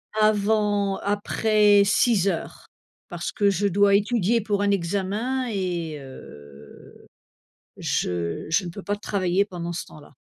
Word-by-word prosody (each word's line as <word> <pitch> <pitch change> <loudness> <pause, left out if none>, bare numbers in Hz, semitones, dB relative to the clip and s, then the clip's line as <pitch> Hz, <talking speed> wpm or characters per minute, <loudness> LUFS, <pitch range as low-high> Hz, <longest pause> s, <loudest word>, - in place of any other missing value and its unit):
avant 210 -2 +2
après 205 0 +2
18:00, 200 -4 0 0.4
parce 175 0 -5
que 205 -1 +2
je 200 +1 0
dois 200 +1 +4
étudier 225 +1 +1
pour 205 -1 -1
un 205 - +1
examen 200 +8 -1
et 175 -6 -3
heu, 75 - -13 0.8
je 85 -2 -2
je 180 +3 +1
ne - - -4
peux 190 +3 -9
pas 205 0 -2
travailler 195 -1 0
pendant 175 -3 -6
ce 170 - -5
temps-là. 145 -2 -16
200 Hz, 130 wpm, -24 LUFS, 175-210 Hz, 0.8 s, dois